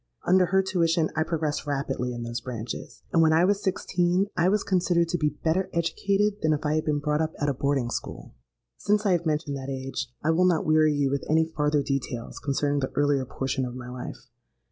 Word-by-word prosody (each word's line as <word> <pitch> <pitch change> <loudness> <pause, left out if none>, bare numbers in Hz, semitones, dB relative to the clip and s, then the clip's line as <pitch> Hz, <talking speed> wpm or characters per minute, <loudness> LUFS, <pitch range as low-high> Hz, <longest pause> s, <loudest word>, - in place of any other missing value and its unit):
Under 185 0 +4
her 190 +2 +3
tuition 165 -4 +1
I 160 - +1
progressed 155 -2 -2
rapidly 135 -3 -2
in 120 -1 -5
those 120 +1 -4
branches; 120 -1 -6
and, 165 - +5
when 160 -1 +5
I 165 +3 +5
was 200 +1 +1
sixteen, 180 0 +1
I 170 +2 +3
was 205 +1 +1
considered 175 -3 +1
to 175 - 0
be 150 -1 0
better 175 +4 +1
educated 200 +5 0
than 155 0 +2
if 150 - -1
I 150 - +1
had 155 0 0
been 150 -1 +1
brought 150 +1 0
up 160 0 -1
at 145 - +1
a - - +1
boarding 135 -2 0
school. - - -6 0.4
"Since 210 +1 +1
I 200 - +3
have 175 -2 +1
mentioned 150 -2 -1
that 135 0 -6
age, 135 -2 -4
I 160 - +3
will 175 +3 +3
not 175 -3 +2
weary 155 -1 +4
you 140 -2 +1
with 140 -1 -1
any 160 +1 +4
farther 150 -2 0
details 130 -4 -3
concerning 145 0 0
the 130 - -2
earlier 145 -2 +2
portion 135 +1 -2
of 125 -1 -4
my 125 -1 -7
life. 125 0 -8
155 Hz, 220 wpm, -26 LUFS, 140-175 Hz, 0.4 s, and